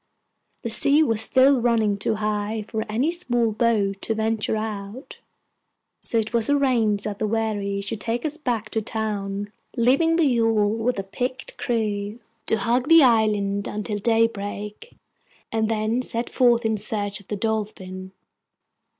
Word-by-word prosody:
The 230 - -3
sea 285 +7 +5
was 225 -7 +2
still 260 +2 +4
running 225 -3 +2
too 200 +2 -1
high 210 0 -2
for 220 -1 -3
any 250 +9 +1
small 240 -10 0
boat 210 -3 0
to 225 - -2
venture 220 0 0
out; 215 +3 -6 0.8
so 230 - +1
it 220 +1 -1
was 230 +1 +3
arranged 240 -8 +2
that 205 -1 -4
the 215 - 0
wherry 205 -2 -1
should 205 +1 -4
take 235 +3 -2
us 305 0 -2
back 235 -8 -3
to 220 - -1
town, 205 -2 -3 0.3
leaving 275 +8 +3
the 335 -1 +3
yawl, 225 -5 +2
with 225 +2 -1
a 195 - -2
picked 250 +6 -4
crew, 210 -2 -2 0.3
to 225 - +2
hug 240 +5 0
the 330 -1 +8
island 210 -4 +2
until 210 0 -3
daybreak, 210 - -1 0.6
and 220 -1 0
then 220 +2 0
set 235 -1 -3
forth 240 -2 +3
in 220 -1 +1
search 205 -1 -2
of 200 - -19
the 210 - -3
Dolphin. 195 -3 -4
220 Hz, 155 wpm, -23 LUFS, 205-240 Hz, 0.8 s, the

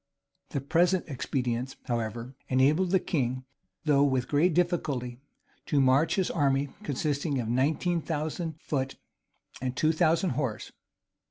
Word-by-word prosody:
The 140 - -2
present 175 +6 +2
expedients, 130 -2 -2
however, 115 +1 -3 0.2
enabled 145 +8 +3
the 190 +1 +4
king, 130 -7 -2 0.4
though 145 -2 +4
with 130 -3 +1
great 155 +3 +2
difficulty, 145 -9 0 0.5
to 145 - +2
march 135 +4 +4
his 190 -3 0
army, 140 -3 +1
consisting 145 0 -1
of 115 - -2
nineteen 150 +8 +1
thousand 160 +1 -3
foot 135 -4 -2 0.7
and 130 -1 -3
two 155 +4 +3
thousand 165 +2 +2
horse. 125 -5 -3
140 Hz, 125 wpm, -28 LUFS, 130-160 Hz, 0.7 s, the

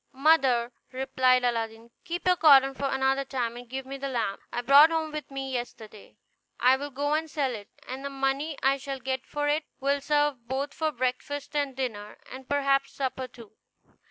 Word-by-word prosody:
"Mother," 265 -4 +3 0.2
replied 255 -1 +2
Aladdin, 230 -1 -2
"keep 345 +1 -4
your 365 0 +5
cotton 275 -5 +6
for 275 +1 -2
another 265 +1 +1
time, 245 -3 -3
and 245 0 -10
give 265 +1 -5
me 275 +1 -7
the 275 - -3
lamp 230 -6 -2
I 240 - -2
brought 280 +5 +8
home 320 -1 -1
with 305 0 -6
me 270 -1 -5
yesterday; 225 -4 -7 0.4
I 255 +1 +5
will 285 +2 -5
go 290 +2 -1
and 315 +1 -1
sell 285 -5 -1
it, 205 -3 -8 0.2
and 260 +2 -6
the 280 - -3
money 275 +2 -1
I 270 +1 +3
shall 275 0 -5
get 260 +1 -3
for 290 0 -2
it 300 +1 +1
will 280 +1 0
serve 290 -4 0
both 270 +3 -2
for 315 -1 -1
breakfast 275 +3 -3
and 285 -3 -1
dinner, 215 -6 -4
and 260 0 -10
perhaps 275 -1 +1
supper 260 -1 -3
too." 235 -4 -14
270 Hz, 190 wpm, -27 LUFS, 250-285 Hz, 0.4 s, brought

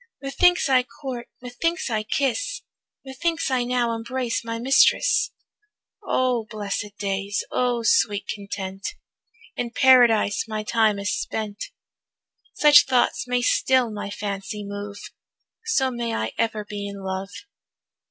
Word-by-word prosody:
Methinks 355 +6 +2
I 260 -2 +4
court, 250 -1 -7 0.2
methinks 330 +8 -2
I 215 -1 0
kiss, 285 - -1 0.4
Methinks 320 +3 -2
I 255 -2 +2
now 240 -1 0
embrace 235 +1 -3
my 230 0 -4
mistress. 270 - +3 0.7
O 250 - 0
blessed 205 -1 -4
days, 200 0 -2
O 245 -2 0
sweet 205 -2 +2
content, 195 -1 -6 0.6
In 245 - -3
Paradise 235 -5 +4
my 215 -1 -3
time 220 -1 +2
is 200 -1 -2
spent. 210 -1 -4 0.9
Such 295 -1 +7
thoughts 250 -2 +1
may 245 0 0
still 255 -2 +2
my 205 -1 -5
fancy 200 +1 -5
move, 205 0 -6 0.7
So 270 -13 +1
may 235 -1 -3
I 110 +1 -2
ever 220 -2 -1
be 205 -1 -5
in 200 -1 -8
love. 190 +1 -4
230 Hz, 125 wpm, -24 LUFS, 205-255 Hz, 0.9 s, Such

